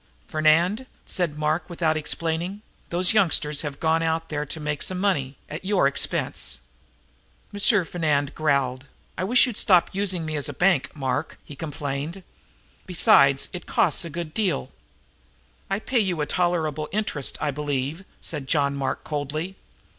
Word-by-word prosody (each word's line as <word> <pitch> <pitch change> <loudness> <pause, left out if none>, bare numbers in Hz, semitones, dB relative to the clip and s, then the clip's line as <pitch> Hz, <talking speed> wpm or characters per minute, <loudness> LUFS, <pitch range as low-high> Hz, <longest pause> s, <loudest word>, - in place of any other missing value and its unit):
"Fernand," 170 +10 +2 0.2
said 170 -5 -1
Mark, 155 +2 -1
without 165 -2 0
explaining, 165 +5 -2 0.3
"those 180 +4 +3
youngsters 160 -8 +3
have 145 -2 -5
gone 160 0 +2
out 165 0 -1
there 150 -1 -3
to 160 - -6
make 150 -1 -3
some 185 - -1
money 145 -9 0
at 155 +4 -7
your 190 -5 +2
expense." 140 +1 +1 1.0
M. 205 - -6 0.3
Fernand 150 -5 0
growled. 140 -3 0 0.3
"I - - -3
wish 245 +8 +6
you'd 245 -5 -4
stop 180 -3 +4
using 190 -4 0
me 155 0 -3
as 145 0 -1
a - - -5
bank, 180 -4 +2
Mark," 135 +2 -2
he 145 - -10
complained. 150 +3 -4 0.6
"Besides, 140 -6 +5
it 180 - -7
costs - - +2
a 170 - -5
good 165 0 -5
deal." 185 - -1 1.0
"I 195 - +1
pay 240 +3 0
you 185 -6 0
a - - +1
tolerable 160 -4 0
interest, 200 -9 -1
I 145 - 0
believe," 145 +3 -2 0.2
said 145 -4 -4
John 140 -1 +2
Mark 135 -1 -2
coldly. 155 +5 -3
155 Hz, 155 wpm, -24 LUFS, 145-180 Hz, 1.0 s, wish